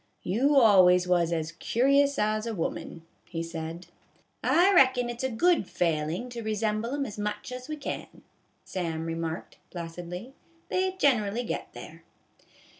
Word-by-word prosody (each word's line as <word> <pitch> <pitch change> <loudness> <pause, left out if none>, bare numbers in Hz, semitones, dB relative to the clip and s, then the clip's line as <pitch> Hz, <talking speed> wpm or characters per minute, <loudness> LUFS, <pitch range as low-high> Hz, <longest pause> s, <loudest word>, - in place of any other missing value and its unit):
" - - -43
You 255 +11 +2
always 185 -7 +6
was 175 -2 +2
as 160 -1 -2
curious 280 +7 +2
as 215 +1 0
a 225 - -3
woman," 165 -1 -4 0.2
he 165 0 -4
said. 165 +1 -6 0.3
" - - -34 0.2
I 370 +4 +4
reckon 255 -7 +4
it 240 - -7
's - - -5
a 260 - +1
good 290 - +2
failin' 165 +7 -1
to 235 -1 -5
resemble 215 +3 -1
'em 285 -1 -1
as 210 -3 -7
much 210 +4 -4
as 250 +2 -7
we 305 - -2
can," 285 - -7 0.4
Sam 165 -3 -3
remarked, 165 0 -5
placidly; 175 +7 -7 0.2
" 335 0 -35
they 375 0 +1
generally 245 - +1
get - - -5
there." - - -11
215 Hz, 165 wpm, -28 LUFS, 170-260 Hz, 0.4 s, always